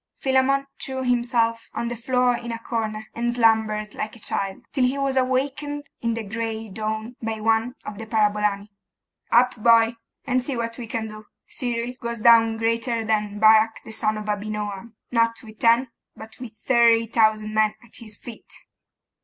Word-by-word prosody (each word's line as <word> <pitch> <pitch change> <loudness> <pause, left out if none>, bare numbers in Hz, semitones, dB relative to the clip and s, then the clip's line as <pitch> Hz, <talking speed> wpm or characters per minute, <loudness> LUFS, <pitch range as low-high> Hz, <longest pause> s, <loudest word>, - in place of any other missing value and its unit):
Philammon 270 +1 +2 0.2
threw 265 -1 -3
himself 235 -2 +1
on 235 - -2
the 240 - -3
floor 250 +1 +1
in 235 0 -6
a 230 - -3
corner, 220 -2 -3
and 240 +1 -1
slumbered 220 -2 +2
like 215 +2 -5
a - - -14
child, 195 +2 -3
till 265 - +1
he 255 +2 +1
was 275 -1 0
awakened 275 +3 -1 0.2
in 230 -1 0
the 230 - -4
gray 220 +1 -4
dawn 220 +3 -4
by 225 -1 -3
one 225 +3 +1
of 205 0 -7
the 225 - -7
parabolani. 210 -1 +1 0.6
'Up, 250 +2 +4
boy! 230 0 +5 0.3
and 255 -2 +1
see 260 -1 -2
what 230 +1 -4
we 235 - -6
can 225 0 -3
do. 215 0 -11 0.2
Cyril 240 -1 -3
goes 235 -1 -4
down 225 -1 +6
greater 230 0 0
than 210 -1 0
Barak 220 +1 +5
the - - -9
son 215 0 0
of 215 - -6
Abinoam, 210 +1 -4 0.2
not 230 0 +1
with 215 -1 -13
ten, 235 +2 +4 0.3
but 220 0 -11
with 235 -3 -9
thirty 230 0 +4
thousand 215 -1 +2
men 215 -1 +2
at 235 - -14
his 215 -3 -7
feet! 235 -2 -12
230 Hz, 175 wpm, -23 LUFS, 215-240 Hz, 0.6 s, down